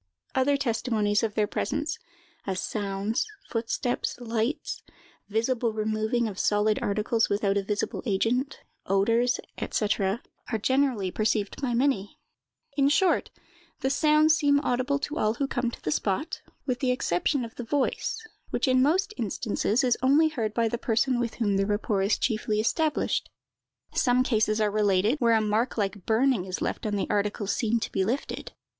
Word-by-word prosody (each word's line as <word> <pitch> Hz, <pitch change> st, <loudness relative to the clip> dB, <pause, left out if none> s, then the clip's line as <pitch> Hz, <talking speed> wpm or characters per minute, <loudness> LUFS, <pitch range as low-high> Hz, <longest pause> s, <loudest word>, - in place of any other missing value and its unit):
Other 275 Hz, +2 st, +2 dB
testimonies 225 Hz, -5 st, +1 dB
of 220 Hz, -3 st, -2 dB
their 215 Hz, -, +3 dB
presence—as 320 Hz, -, -4 dB
sounds, 205 Hz, -, -2 dB, 0.2 s
footsteps, 235 Hz, +1 st, -1 dB
lights, 235 Hz, +3 st, -2 dB, 0.5 s
visible 230 Hz, +2 st, 0 dB
removing 220 Hz, +2 st, 0 dB
of 195 Hz, -3 st, -6 dB
solid 210 Hz, +1 st, +2 dB
articles 215 Hz, +3 st, +1 dB
without 200 Hz, -1 st, +1 dB
a 200 Hz, -, +2 dB
visible 205 Hz, +1 st, -2 dB
agent, 240 Hz, +8 st, 0 dB, 0.3 s
odors, 230 Hz, +6 st, +2 dB, 0.3 s
&c.—are 210 Hz, +2 st, -1 dB
generally 255 Hz, -6 st, +1 dB
perceived 215 Hz, +1 st, -1 dB
by 245 Hz, -4 st, 0 dB
many; 235 Hz, -6 st, 0 dB, 0.6 s
in 280 Hz, -1 st, +3 dB
short, 365 Hz, +5 st, +2 dB, 0.5 s
the 265 Hz, -, +1 dB
sounds 305 Hz, +1 st, +4 dB
seem 285 Hz, -2 st, +3 dB
audible 255 Hz, +1 st, 0 dB
to 290 Hz, +2 st, -4 dB
all 215 Hz, +1 st, +1 dB
who 275 Hz, -, 0 dB
come 245 Hz, -2 st, -1 dB
to -, -, -10 dB
the 150 Hz, -, -1 dB
spot, 200 Hz, -, -1 dB, 0.2 s
with 255 Hz, -2 st, -1 dB
the 260 Hz, -, 0 dB
exception 250 Hz, -, 0 dB
of 225 Hz, -, -10 dB
the 245 Hz, -, -6 dB
voice, 285 Hz, -, -1 dB, 0.2 s
which -, -, 0 dB
in 255 Hz, 0 st, +4 dB
most 375 Hz, +9 st, +2 dB
instances 220 Hz, +3 st, 0 dB
is 245 Hz, -2 st, +2 dB
only 290 Hz, +5 st, +4 dB
heard 225 Hz, -8 st, -3 dB
by 230 Hz, -1 st, +2 dB
the 235 Hz, +1 st, -2 dB
person 240 Hz, +2 st, +1 dB
with 235 Hz, -2 st, -2 dB
whom 205 Hz, -4 st, +1 dB
the 195 Hz, -, +2 dB
rapport 205 Hz, -1 st, 0 dB
is 195 Hz, +3 st, +2 dB
chiefly 215 Hz, -2 st, 0 dB
established. 305 Hz, +7 st, 0 dB, 0.6 s
Some 250 Hz, 0 st, +3 dB
cases 215 Hz, -3 st, +1 dB
are 210 Hz, -1 st, +2 dB
related, 210 Hz, +5 st, +2 dB
where 235 Hz, -3 st, +4 dB
a 220 Hz, -, +3 dB
mark 215 Hz, +4 st, 0 dB
like 200 Hz, -2 st, -2 dB
burning 230 Hz, -3 st, +2 dB
is 185 Hz, -1 st, -4 dB
left -, -, -2 dB
on 210 Hz, -, -1 dB
the 200 Hz, -, 0 dB
articles 205 Hz, -1 st, -1 dB
seen 230 Hz, 0 st, +1 dB
to -, -, -3 dB
be 190 Hz, -, +1 dB
lifted. 240 Hz, +8 st, -3 dB
230 Hz, 160 wpm, -27 LUFS, 210-265 Hz, 0.6 s, sounds